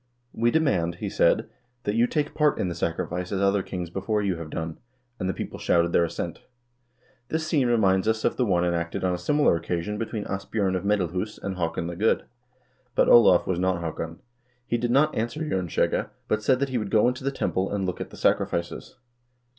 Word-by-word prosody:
"We 115 +1 +2
demand," 100 - +1
he - - -5
said, - - +3 0.4
"that 105 - -1
you 115 +2 +3
take 150 +1 -1
part 150 -1 +2
in 90 - -1
the - - -3
sacrifice 90 +2 -3
as 100 - -1
other 100 0 +3
kings 90 -2 -5
before 105 +3 -1
you 95 -3 0
have 80 -2 -7
done," 80 +1 -5 0.4
and 95 - -1
the - - 0
people - - -6
shouted 85 0 +2
their 85 - +4
assent.1 85 - -5 0.9
This 160 0 -1
scene 145 -5 +2
reminds 100 -5 +3
us 110 0 +1
of - - +2
the 125 - +1
one 90 -6 +2
enacted 85 0 -2
on 90 -1 +1
a - - -1
similar 145 - +3
occasion 85 +5 -3
between 110 -2 -3
Asbj0rn 95 0 -1
of 90 - -2
Medalhus 100 0 -1
and 100 -1 -4
Haakon 85 -1 -2
the 85 0 -4
Good. 105 +6 +2 0.7
But - - +4
Olav 115 -7 +7
was 90 -2 -1
not 95 -1 +1
Haakon. 85 0 -5 0.4
He 120 - -1
did 120 +1 -1
not 145 +5 +3
answer 120 +8 -2
Jern 95 - -1
skjegge, - - 0 0.2
but 110 - 0
said 130 +3 +2
that 140 - +1
he 130 -2 -1
would 105 -2 -4
go 110 +2 +4
into 125 +1 -2
the 135 - +1
temple 95 -7 -1
and 100 -2 -1
look 90 -1 -3
at - - -5
the - - -12
sacrifices. 85 0 -1
95 Hz, 210 wpm, -26 LUFS, 85-115 Hz, 0.9 s, Olav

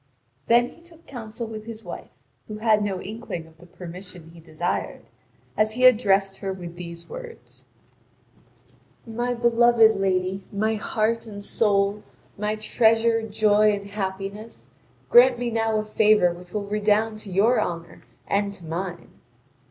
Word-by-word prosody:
Then 240 +1 +4
he 335 - -18
took 335 -1 -17
counsel 235 -2 -7
with 215 -1 -8
his 225 -1 -8
wife, - - -8 0.4
who 215 - -6
had 215 -1 +3
no 195 -3 -2
inkling 205 -5 -6
of 160 0 -21
the 175 - -15
permission 180 -1 -10
he 170 - -14
desired, 165 +1 -4 0.5
as 215 0 +1
he 255 +2 +2
addressed 200 -5 +4
her 195 - -3
with 175 -2 -8
these 170 -1 -9
words: 485 -2 -11 1.4
"My 240 +2 -2
beloved 235 -1 +4
lady, 190 0 -1
my 215 +2 0
heart 220 +2 -1
and 200 -2 -8
soul, 205 -1 +1 0.3
my 210 +1 -2
treasure, 225 +1 +2
joy, 215 -1 +3
and 200 0 -6
happiness, 195 - -6 0.4
grant 245 +1 +7
me 240 0 -2
now 225 -1 0
a 215 - -2
favour 210 -4 +3
which 175 +1 -13
will 210 0 -3
redound 210 +1 +1
to 205 -2 -8
your 215 +7 +3
honour 170 -1 -5 0.2
and 200 0 0
to 175 - -13
mine." 170 +1 -5
210 Hz, 150 wpm, -24 LUFS, 190-225 Hz, 1.4 s, grant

